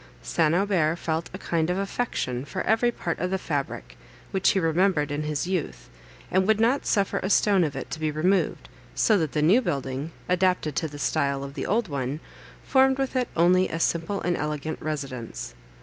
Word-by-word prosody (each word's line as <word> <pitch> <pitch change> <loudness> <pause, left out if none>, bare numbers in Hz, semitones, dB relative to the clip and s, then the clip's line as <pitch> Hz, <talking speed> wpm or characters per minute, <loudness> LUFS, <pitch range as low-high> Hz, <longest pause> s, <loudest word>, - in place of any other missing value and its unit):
St. 60 - +2
Aubert 180 -5 +2
felt 165 0 -2
a 185 - -6
kind 170 -3 -1
of 180 - 0
affection 195 - -2
for 140 - -4
every 225 +2 +3
part 170 -7 -4
of 180 - -1
the 190 - 0
fabric, 140 - -4 0.3
which 190 -1 +2
he 195 - +2
remembered 165 -3 +2
in 145 +1 -2
his 150 0 -2
youth, 180 -3 -3 0.4
and 190 +1 +2
would 220 -1 +3
not 240 +5 +2
suffer 200 -2 +1
a 190 - -3
stone 200 -3 +4
of 145 -4 -2
it 135 - -6
to 160 - -4
be 155 -1 0
removed, 175 +6 0 0.3
so 220 - +4
that 160 -4 -2
the 150 - +1
new 195 +11 +5
building, 140 - -3 0.2
adapted 180 -4 +1
to 160 - 0
the 145 -1 -9
style 140 -1 0
of 140 0 -7
the 140 - -4
old 220 +2 +1
one, 140 -1 -3 0.4
formed 265 -1 +4
with 270 -1 -2
it 250 -2 +1
only 180 +2 +4
a 165 - -3
simple 170 +4 0
and 175 0 0
elegant 150 +1 -3
residence. 135 - -5
165 Hz, 195 wpm, -26 LUFS, 145-195 Hz, 0.4 s, new